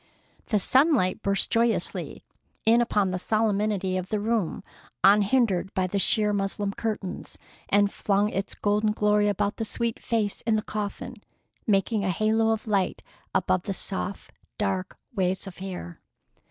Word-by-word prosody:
The 215 - +2
sunlight 260 - +3
burst 200 0 0
joyously 230 0 +1 0.4
in 230 +2 +5
upon 205 -5 +1
the 185 - -2
solemnity 210 -3 0
of 185 0 -4
the 215 - 0
room, 215 -4 -1 0.4
unhindered 200 -2 +4
by 185 - +2
the 200 +2 -1
sheer 210 +1 +3
muslin 200 0 -1
curtains, 210 -5 -4 0.3
and 205 0 +3
flung 205 +1 +1
its 195 -1 -3
golden 210 +1 +1
glory 210 -1 +2
about 205 0 0
the 225 - -2
sweet 230 +1 -2
face 215 -3 -1
in 225 -1 +1
the 215 - 0
coffin, 210 -1 -5 0.5
making 205 +1 +2
a 195 - 0
halo 220 +4 +2
of 225 -1 -1
light 200 -4 0 0.3
above 185 - +2
the 195 +2 -4
soft, 195 +1 -4 0.3
dark 190 -3 -2 0.2
waves 190 -1 0
of 190 -2 -10
hair. 180 - -7
205 Hz, 150 wpm, -26 LUFS, 195-215 Hz, 0.5 s, in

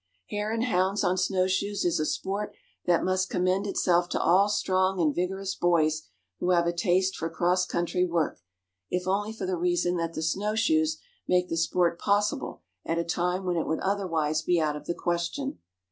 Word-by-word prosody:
Hare 210 +1 -2
and 225 +1 0
hounds 195 -3 +1
on 180 -1 +2
snow 185 0 +1
shoes 200 +2 -1
is 175 - +2
a 155 - 0
sport 200 +2 -3 0.3
that 175 -1 +3
must 185 0 0
commend 185 +3 +1
itself 175 -3 +2
to - - -1
all 190 +4 +4
strong 190 -2 +1
and 155 -4 +2
vigorous 190 +3 -2
boys 155 -3 +1 0.3
who 180 - -1
have 170 -1 +4
a 170 - +1
taste 185 +2 +1
for 165 - -3
cross 180 +2 +1
country 175 +1 0
work, 170 -3 -1 0.5
if 180 0 -1
only 205 +3 0
for 220 - -5
the 185 -1 -1
reason 175 0 +1
that 165 0 -3
the 160 - -3
snow 200 +6 0
shoes 315 +7 +2 0.3
make 180 0 +2
the - - -1
sport 170 +1 +1
possible 205 0 0 0.2
at 165 - -1
a 170 - +1
time 180 +2 -1
when 180 -1 0
it 165 - -1
would 160 - 0
otherwise 165 -6 0
be 175 +2 +2
out 150 -2 0
of 150 0 -9
the 170 - -1
question. 175 +11 -2
180 Hz, 195 wpm, -27 LUFS, 170-195 Hz, 0.5 s, all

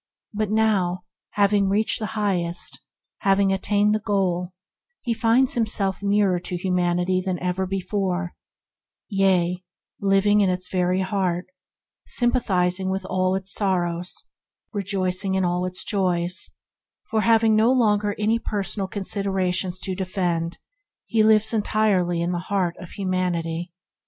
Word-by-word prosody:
Now, 210 -4 +1 0.3
having 200 -1 +3
reached 215 +4 +2
the 215 - -3
highest, 180 -5 -1 0.4
having 195 0 +3
attained 205 +2 +2
the 215 - +1
goal, 190 -4 -1 0.5
he 235 - 0
finds 230 +4 +3
himself 210 -6 -1
nearer 200 -2 +2
to 180 0 -4
humanity 180 0 +1
than 185 -1 -1
ever 180 +1 -2
before 190 -2 -2 0.4
— - - -67 0.3
yea, 185 -3 +1 0.4
living 200 +1 +3
in 195 - +3
its 180 0 -3
very 185 0 +1
heart, 185 -2 -1 0.6
sympathizing 190 -7 +1
with 190 0 -2
all 185 0 0
its 190 +1 -4
sorrows, 180 -3 -1 0.5
rejoicing 190 -1 -1
in 190 -1 +1
all 180 +1 0
its 180 0 -4
joys; 180 -2 0 0.6
having 220 0 +4
no 220 +3 +4
longer 210 -5 +2
any 220 +2 +1
personal 200 -2 -2
considerations 190 -2 -1
to 190 - -2
defend, 180 -3 -2 0.5
he 225 - +1
lives 220 +1 +4
entirely 205 -5 +1
in 170 +1 0
the 175 - -1
heart 185 -4 0
of 180 - -10
humanity. 175 -3 -2
190 Hz, 125 wpm, -23 LUFS, 180-205 Hz, 0.6 s, having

